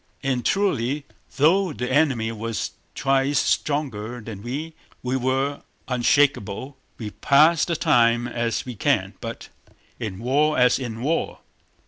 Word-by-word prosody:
And 130 Hz, -3 st, 0 dB
truly 150 Hz, -, 0 dB, 0.3 s
though 170 Hz, +4 st, +3 dB
the 125 Hz, +3 st, -4 dB
enemy 130 Hz, -7 st, +2 dB
was 115 Hz, 0 st, -3 dB, 0.2 s
twice 135 Hz, 0 st, +1 dB
stronger 125 Hz, -6 st, -1 dB
than 110 Hz, -3 st, -8 dB
we, 145 Hz, +8 st, -5 dB, 0.3 s
we 125 Hz, +1 st, -1 dB
were 135 Hz, +2 st, 0 dB, 0.3 s
unshakable. 130 Hz, -1 st, +1 dB, 0.2 s
We 110 Hz, -3 st, -6 dB
pass 155 Hz, +7 st, +4 dB
the 170 Hz, -, -1 dB
time 120 Hz, -3 st, +3 dB
as 120 Hz, -1 st, -2 dB
we 125 Hz, -, -5 dB
can, 105 Hz, -, 0 dB
but -, -, -7 dB, 0.5 s
in 100 Hz, -4 st, -4 dB
war 145 Hz, +7 st, +1 dB
as 125 Hz, 0 st, +4 dB
in 120 Hz, -2 st, -5 dB
war! 160 Hz, +4 st, -1 dB
130 Hz, 130 wpm, -23 LUFS, 115-145 Hz, 0.5 s, pass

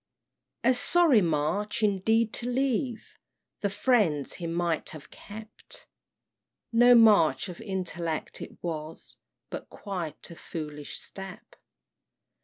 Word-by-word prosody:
"A 255 Hz, +2 st, +5 dB
sorry 295 Hz, -2 st, +5 dB
March 175 Hz, +7 st, 0 dB
indeed 215 Hz, +3 st, +2 dB
to 245 Hz, -, -2 dB
leave 250 Hz, -2 st, -1 dB, 0.4 s
The 200 Hz, -, 0 dB
friends 195 Hz, -, +2 dB
he 170 Hz, -, -5 dB
might 170 Hz, -1 st, -1 dB
have 155 Hz, -2 st, -11 dB
kep', 215 Hz, +1 st, -11 dB, 1.1 s
No 245 Hz, +1 st, +7 dB
March 205 Hz, -, +5 dB
of 175 Hz, -, -8 dB
Intellect 175 Hz, -6 st, -3 dB
it -, -, -9 dB
was, 160 Hz, -2 st, -6 dB, 0.3 s
But -, -, -6 dB
quite 180 Hz, -6 st, -6 dB
a -, -, -9 dB
foolish 150 Hz, -3 st, -6 dB
step. 195 Hz, -, -9 dB
195 Hz, 110 wpm, -28 LUFS, 165-230 Hz, 1.1 s, No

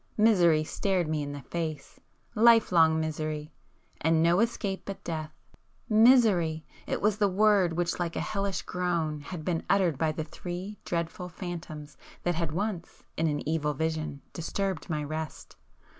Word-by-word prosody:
Misery 175 Hz, -8 st, +5 dB
stared 185 Hz, +1 st, 0 dB
me 155 Hz, -1 st, -1 dB
in 145 Hz, 0 st, -4 dB
the 145 Hz, -1 st, -7 dB
face,—life 210 Hz, -, +1 dB
long 160 Hz, -2 st, +5 dB
misery,—and 155 Hz, +1 st, -3 dB
no 170 Hz, +2 st, +4 dB
escape 210 Hz, -4 st, -1 dB
but 195 Hz, -, -7 dB
death. 155 Hz, -2 st, -4 dB, 0.6 s
Misery!—it 215 Hz, -9 st, +3 dB
was 210 Hz, -1 st, +3 dB
the 205 Hz, -, +4 dB
word 195 Hz, -2 st, +3 dB
which 175 Hz, +1 st, -1 dB
like 170 Hz, -1 st, -2 dB
a -, -, -1 dB
hellish 200 Hz, -2 st, -2 dB
groan, 170 Hz, -4 st, -1 dB
had 155 Hz, +2 st, -7 dB
been 170 Hz, -2 st, 0 dB
uttered 180 Hz, -8 st, +2 dB
by 160 Hz, -1 st, +2 dB
the 155 Hz, +1 st, -3 dB
three 180 Hz, +5 st, -7 dB
dreadful 170 Hz, +2 st, -3 dB
phantoms 165 Hz, -4 st, -7 dB, 0.3 s
that 175 Hz, -, +1 dB
had 165 Hz, -2 st, -2 dB
once, 185 Hz, 0 st, -4 dB
in 165 Hz, -, +1 dB
an 145 Hz, -1 st, -2 dB
evil 150 Hz, -2 st, 0 dB
vision, 155 Hz, -2 st, -2 dB
disturbed 190 Hz, +1 st, -3 dB
my 150 Hz, -2 st, -1 dB
rest. 155 Hz, +1 st, -6 dB
170 Hz, 145 wpm, -28 LUFS, 155-195 Hz, 0.6 s, Misery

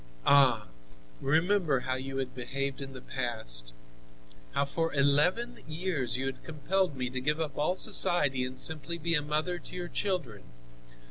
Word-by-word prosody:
"Ah! 130 Hz, -6 st, +5 dB, 0.6 s
Remember 160 Hz, -1 st, +2 dB
how 130 Hz, -, -1 dB
you 135 Hz, +1 st, -4 dB
have 130 Hz, -1 st, -3 dB
behaved 135 Hz, +2 st, -4 dB
in 135 Hz, -1 st, -7 dB
the 130 Hz, -1 st, -10 dB
past! 110 Hz, -, -1 dB, 0.8 s
How 140 Hz, -, +1 dB
for 165 Hz, +3 st, -2 dB
eleven 150 Hz, -, +2 dB
years 155 Hz, -6 st, -1 dB
you 130 Hz, -, -3 dB
have 135 Hz, -1 st, -5 dB
compelled 165 Hz, +2 st, -1 dB
me 125 Hz, -1 st, -2 dB
to 130 Hz, 0 st, -3 dB
give 150 Hz, +4 st, 0 dB
up 150 Hz, -4 st, -3 dB
all 155 Hz, +5 st, +1 dB
society 150 Hz, -10 st, +4 dB
and 130 Hz, +1 st, -5 dB
simply 160 Hz, +3 st, 0 dB
be 170 Hz, +1 st, -1 dB
a 150 Hz, -, +3 dB
mother 155 Hz, +4 st, -1 dB
to -, -, -11 dB
your 175 Hz, -1 st, -5 dB
children. 180 Hz, -, -3 dB
145 Hz, 160 wpm, -29 LUFS, 130-170 Hz, 0.8 s, Ah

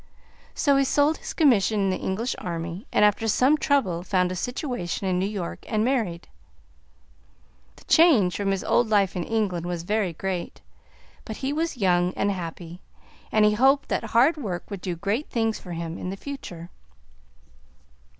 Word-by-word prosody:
So 280 Hz, -3 st, +3 dB
he 275 Hz, -, +4 dB
sold 290 Hz, +3 st, +2 dB
his -, -, -6 dB
commission 225 Hz, -, +3 dB
in 195 Hz, -, +1 dB
the 185 Hz, -, -1 dB
English 220 Hz, +7 st, -2 dB
army, 170 Hz, -, -5 dB
and 210 Hz, -, +4 dB
after 210 Hz, +2 st, +1 dB
some 255 Hz, +7 st, +4 dB
trouble 270 Hz, -, +1 dB
found 180 Hz, -1 st, 0 dB
a -, -, -3 dB
situation 245 Hz, -, -3 dB
in 180 Hz, -1 st, +1 dB
New 190 Hz, -, 0 dB
York, 195 Hz, -5 st, -5 dB
and 215 Hz, 0 st, +1 dB
married. 220 Hz, -10 st, -1 dB, 1.5 s
The -, -, -18 dB
change 265 Hz, -, +4 dB
from 200 Hz, -1 st, -1 dB
his 195 Hz, -1 st, -1 dB
old 240 Hz, -2 st, +2 dB
life 200 Hz, -3 st, +2 dB
in 180 Hz, -, -2 dB
England 190 Hz, -6 st, -1 dB
was 175 Hz, -2 st, -3 dB
very 200 Hz, -1 st, 0 dB
great, 180 Hz, +1 st, -4 dB, 0.6 s
but 220 Hz, -, -7 dB
he 275 Hz, -, 0 dB
was 325 Hz, -2 st, -2 dB
young 180 Hz, -3 st, +2 dB
and 200 Hz, -, +1 dB
happy, 175 Hz, -1 st, -7 dB, 0.5 s
and 215 Hz, -1 st, +4 dB
he 210 Hz, -, +4 dB
hoped 270 Hz, +5 st, +3 dB
that -, -, -1 dB
hard 265 Hz, +8 st, +3 dB
work 200 Hz, -9 st, -5 dB
would 200 Hz, -3 st, -5 dB
do 180 Hz, -2 st, -3 dB
great 205 Hz, -, -2 dB
things 225 Hz, -2 st, -1 dB
for 180 Hz, -, -8 dB
him 170 Hz, 0 st, -5 dB
in 180 Hz, -, -4 dB
the 195 Hz, -, -5 dB
future. 180 Hz, -11 st, -8 dB
200 Hz, 175 wpm, -25 LUFS, 180-245 Hz, 1.5 s, he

